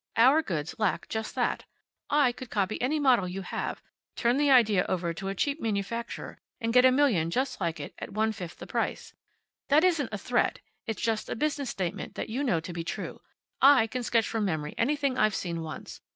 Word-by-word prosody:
Our 265 Hz, +7 st, +6 dB
goods 165 Hz, -, -3 dB
lack 215 Hz, -3 st, 0 dB
just 220 Hz, 0 st, -4 dB
that. -, -, 0 dB, 0.4 s
I 285 Hz, -3 st, +4 dB
could 245 Hz, 0 st, -9 dB
copy 200 Hz, -2 st, -1 dB
any 290 Hz, +5 st, +1 dB
model 250 Hz, -9 st, +4 dB
you 190 Hz, +2 st, -5 dB
have, -, -, -4 dB, 0.3 s
turn 240 Hz, +2 st, +2 dB
the 290 Hz, 0 st, +3 dB
idea 220 Hz, -8 st, +5 dB
over 170 Hz, -2 st, -1 dB
to 195 Hz, +4 st, -6 dB
a 195 Hz, -, -3 dB
cheap 285 Hz, -, -1 dB
manufacturer, 225 Hz, +2 st, -3 dB, 0.2 s
and 230 Hz, -2 st, -1 dB
get 250 Hz, +1 st, +7 dB
a 260 Hz, -, +7 dB
million 250 Hz, -, +3 dB
just 255 Hz, +4 st, -1 dB
like 165 Hz, -3 st, -1 dB
it, 145 Hz, -, -7 dB
at -, -, -6 dB
one 220 Hz, +2 st, +1 dB
fifth 180 Hz, -5 st, -7 dB
the -, -, -8 dB
price. -, -, -3 dB, 0.6 s
That 295 Hz, +3 st, +5 dB
isn't 330 Hz, -8 st, +2 dB
a 210 Hz, -, -3 dB
threat. 240 Hz, +5 st, 0 dB, 0.3 s
It's 220 Hz, -, -3 dB
just 225 Hz, -2 st, -1 dB
a -, -, -2 dB
business 285 Hz, 0 st, -1 dB
statement 180 Hz, -3 st, -4 dB
that -, -, -4 dB
you 255 Hz, +6 st, -2 dB
know 190 Hz, -, +2 dB
to 175 Hz, +2 st, -7 dB
be 170 Hz, -1 st, -4 dB
true. 170 Hz, -, -5 dB, 0.4 s
I 270 Hz, -4 st, +7 dB
can 250 Hz, +3 st, -4 dB
sketch 230 Hz, -2 st, +1 dB
from 225 Hz, -2 st, -1 dB
memory 155 Hz, -6 st, -2 dB
anything 280 Hz, +1 st, 0 dB
I've 215 Hz, -2 st, +3 dB
seen 170 Hz, -2 st, -3 dB
once. 160 Hz, -1 st, -8 dB
225 Hz, 210 wpm, -28 LUFS, 185-260 Hz, 0.6 s, get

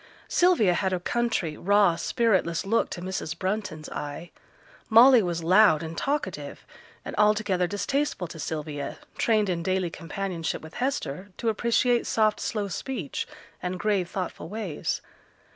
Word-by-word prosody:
Sylvia 345 Hz, -, +4 dB
had 190 Hz, +1 st, 0 dB
a 180 Hz, -, 0 dB
country, 225 Hz, -6 st, -1 dB
raw, 200 Hz, -2 st, +4 dB
spiritless 190 Hz, -2 st, +1 dB
look 225 Hz, +4 st, +1 dB
to 175 Hz, -, -6 dB
Mrs. 185 Hz, -4 st, -4 dB
Brunton's 185 Hz, -5 st, -3 dB
eye; 145 Hz, +4 st, -6 dB, 0.6 s
Molly 240 Hz, +2 st, +8 dB
was 170 Hz, -3 st, -2 dB
loud 175 Hz, -2 st, +5 dB
and 160 Hz, 0 st, -6 dB
talkative, 285 Hz, -, -3 dB, 0.4 s
and -, -, -5 dB
altogether 210 Hz, -4 st, +3 dB
distasteful 270 Hz, +1 st, -1 dB
to 165 Hz, -, -9 dB
Sylvia, 150 Hz, -2 st, -4 dB, 0.2 s
trained 215 Hz, -3 st, +3 dB
in 175 Hz, -2 st, -1 dB
daily 185 Hz, 0 st, 0 dB
companionship 170 Hz, -1 st, -4 dB
with 160 Hz, -, -11 dB
Hester 200 Hz, -, -2 dB
to 230 Hz, -, 0 dB
appreciate 235 Hz, +2 st, +2 dB
soft 215 Hz, -1 st, +2 dB
slow 210 Hz, -3 st, -2 dB
speech, 195 Hz, -, -4 dB, 0.3 s
and 180 Hz, 0 st, -3 dB
grave 195 Hz, -3 st, 0 dB
thoughtful 185 Hz, -2 st, -5 dB
ways. 205 Hz, -8 st, -3 dB
190 Hz, 140 wpm, -26 LUFS, 170-220 Hz, 0.6 s, Molly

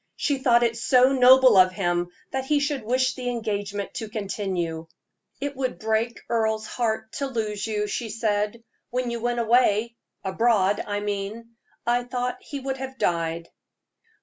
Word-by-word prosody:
She 285 Hz, -3 st, 0 dB
thought 240 Hz, -2 st, +4 dB
it 230 Hz, -1 st, +1 dB
so 250 Hz, +3 st, +4 dB
noble 255 Hz, -2 st, +7 dB
of 185 Hz, 0 st, +6 dB
him 175 Hz, -2 st, 0 dB, 0.2 s
that 265 Hz, 0 st, -2 dB
he 295 Hz, +1 st, +2 dB
should 285 Hz, -2 st, -1 dB
wish 255 Hz, +3 st, +1 dB
the 250 Hz, -1 st, -4 dB
engagement 205 Hz, -4 st, -3 dB
to 220 Hz, -, -5 dB
continue. 190 Hz, -6 st, -3 dB, 0.5 s
"It 285 Hz, +1 st, -3 dB
would 260 Hz, -1 st, -2 dB
break 220 Hz, +2 st, -1 dB
Earle's 220 Hz, -2 st, 0 dB
heart 220 Hz, -2 st, -2 dB
to 280 Hz, -, -1 dB
lose 215 Hz, -5 st, -3 dB
you," 210 Hz, -1 st, -1 dB
she 225 Hz, +2 st, -3 dB
said. 210 Hz, 0 st, -1 dB, 0.3 s
"When 250 Hz, 0 st, -2 dB
you 235 Hz, -, -3 dB
went 240 Hz, 0 st, 0 dB
away 235 Hz, -1 st, +3 dB, 0.3 s
abroad, 205 Hz, 0 st, +2 dB
I 205 Hz, 0 st, -2 dB
mean 205 Hz, +3 st, -4 dB, 0.3 s
I 240 Hz, +1 st, +2 dB
thought 250 Hz, 0 st, -3 dB
he 285 Hz, -, -6 dB
would 265 Hz, 0 st, -3 dB
have 265 Hz, 0 st, -7 dB
died." 170 Hz, -3 st, -1 dB
225 Hz, 160 wpm, -25 LUFS, 205-250 Hz, 0.5 s, noble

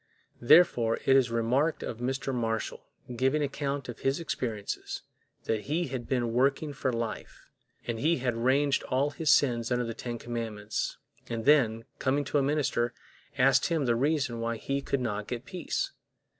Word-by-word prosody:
Therefore 120 Hz, -4 st, +5 dB
it 135 Hz, -, +5 dB
is 130 Hz, -3 st, +4 dB
remarked 120 Hz, +7 st, +1 dB
of 115 Hz, -, -5 dB
Mr. 135 Hz, +2 st, -2 dB
Marshall, 115 Hz, -2 st, -2 dB, 0.3 s
giving 135 Hz, +5 st, +2 dB
account 140 Hz, -1 st, -3 dB
of 120 Hz, -, -7 dB
his 135 Hz, +3 st, 0 dB
experiences, 115 Hz, -10 st, -4 dB, 0.4 s
that 110 Hz, -2 st, -2 dB
he 155 Hz, +2 st, -1 dB
had 125 Hz, -3 st, -5 dB
been 120 Hz, -3 st, 0 dB
working 140 Hz, +4 st, +1 dB
for 135 Hz, -1 st, -1 dB
life, 115 Hz, -3 st, -5 dB, 0.3 s
and 115 Hz, -2 st, -3 dB
he 160 Hz, +6 st, +2 dB
had 125 Hz, -2 st, -1 dB
ranged 135 Hz, +4 st, +2 dB
all 140 Hz, +3 st, +1 dB
his 155 Hz, +1 st, -2 dB
sins 125 Hz, -5 st, +3 dB
under 125 Hz, 0 st, +1 dB
the 115 Hz, -, -4 dB
ten 120 Hz, +1 st, -5 dB
commandments, 110 Hz, -3 st, -4 dB, 0.3 s
and 115 Hz, -1 st, -3 dB
then, 115 Hz, -6 st, +4 dB
coming 140 Hz, +2 st, +1 dB
to 145 Hz, +1 st, +1 dB
a -, -, +2 dB
minister, 135 Hz, -4 st, 0 dB, 0.4 s
asked 135 Hz, +1 st, +4 dB
him 165 Hz, -5 st, 0 dB
the 120 Hz, -1 st, +2 dB
reason 135 Hz, -2 st, 0 dB
why 115 Hz, 0 st, -2 dB
he 135 Hz, +5 st, -2 dB
could 140 Hz, -1 st, -1 dB
not 105 Hz, -4 st, -2 dB
get 120 Hz, +1 st, -5 dB
peace. 180 Hz, -3 st, -3 dB
125 Hz, 170 wpm, -29 LUFS, 115-140 Hz, 0.4 s, Therefore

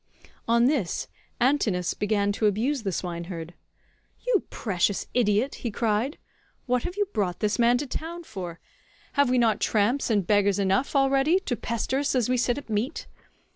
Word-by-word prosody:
On 235 Hz, +1 st, +4 dB
this 250 Hz, -, 0 dB, 0.3 s
Antinous 240 Hz, -9 st, +2 dB
began 205 Hz, -1 st, 0 dB
to 210 Hz, +1 st, +1 dB
abuse 240 Hz, +7 st, 0 dB
the 200 Hz, -3 st, -2 dB
swineherd. 170 Hz, -1 st, -5 dB, 0.7 s
"You -, -, +2 dB
precious 195 Hz, -2 st, -1 dB
idiot," 230 Hz, +2 st, +2 dB
he 240 Hz, -, -2 dB
cried, 225 Hz, +5 st, 0 dB, 0.5 s
"what 250 Hz, -1 st, +1 dB
have 355 Hz, -, -5 dB
you 410 Hz, -, +2 dB
brought 185 Hz, -4 st, -1 dB
this 210 Hz, +2 st, 0 dB
man 240 Hz, +1 st, +5 dB
to 290 Hz, -, -3 dB
town 330 Hz, +5 st, -5 dB
for? 180 Hz, -, -7 dB, 0.5 s
Have 285 Hz, -2 st, +3 dB
we 255 Hz, -, +2 dB
not 230 Hz, -3 st, +2 dB
tramps 230 Hz, +7 st, +1 dB
and 205 Hz, -5 st, +2 dB
beggars 205 Hz, 0 st, +3 dB
enough 195 Hz, +8 st, +1 dB
already 275 Hz, +5 st, +4 dB
to 250 Hz, -, -2 dB
pester 235 Hz, +3 st, -2 dB
us 285 Hz, -1 st, 0 dB
as 245 Hz, -2 st, +1 dB
we 255 Hz, -, +2 dB
sit 245 Hz, +1 st, +1 dB
at 285 Hz, -, -7 dB
meat? 225 Hz, +7 st, -2 dB
230 Hz, 170 wpm, -26 LUFS, 200-270 Hz, 0.7 s, man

